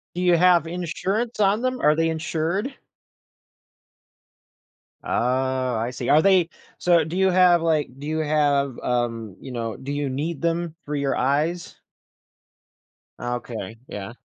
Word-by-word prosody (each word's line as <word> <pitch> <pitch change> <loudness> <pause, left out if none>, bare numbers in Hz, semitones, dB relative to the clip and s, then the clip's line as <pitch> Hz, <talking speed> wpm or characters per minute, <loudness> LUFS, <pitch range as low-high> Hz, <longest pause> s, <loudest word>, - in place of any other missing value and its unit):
Do 180 - -2
you 175 -1 +5
have 175 -1 +5
insurance 190 +7 -3
on 205 +3 +3
them? 255 0 -1
Are 150 +1 +4
they 165 0 +1
insured? 165 - -2 2.3
Oh, 130 0 0
I 115 +3 -2
see. 125 -1 -4
Are 155 - +6
they 185 -3 +4 0.3
so, 170 -2 +3
do 165 +3 -5
you 190 0 +4
have, 180 -2 +5
like 155 -3 +1
do 145 - -7
you 155 0 -1
have, 145 -4 +1
um, 115 -5 -2
you 135 - -9
know, 115 -3 -4
do 140 +2 -6
you 145 -1 -2
need 150 +4 -3
them 170 -1 -1
for 150 0 -3
your 140 -1 0
eyes? 150 +7 -1 1.4
Okay. 120 -1 -5
Yeah. 105 +3 -7
155 Hz, 145 wpm, -23 LUFS, 130-175 Hz, 2.3 s, Are